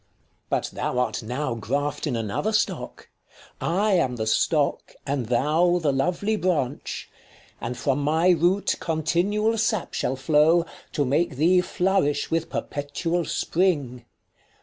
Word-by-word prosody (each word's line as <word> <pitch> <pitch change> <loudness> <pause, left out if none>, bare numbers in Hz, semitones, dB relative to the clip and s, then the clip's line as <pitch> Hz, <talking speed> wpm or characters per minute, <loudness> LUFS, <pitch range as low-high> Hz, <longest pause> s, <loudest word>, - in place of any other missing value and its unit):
But - - -1
thou - - -2
art 125 0 0
now 125 +4 -3
graft 140 +8 -2
in 130 - -1
another 115 - -2
stock; 215 - -2 0.5
1 - - -2
5 175 +3 +1
I 215 0 +2
am 125 -2 -3
the 110 -2 -3
stock, 145 +6 +1
and 135 -4 -2
thou 155 +9 +2
the 155 -5 +1
lovely 180 +10 0
branch: 150 -9 -2 0.5
And 120 +2 -4
from 135 +3 0
my 160 +5 +2
root 175 +4 +2
continual 190 +8 0
sap 220 -3 0
shall 130 - -1
flow, 155 +5 +3 0.3
To 145 - +1
make 145 +3 +1
thee 175 +6 +4
flourish 180 -6 0
with 165 0 0
perpetual 165 +4 -2
spring. 145 -10 0
150 Hz, 140 wpm, -24 LUFS, 135-180 Hz, 0.5 s, thee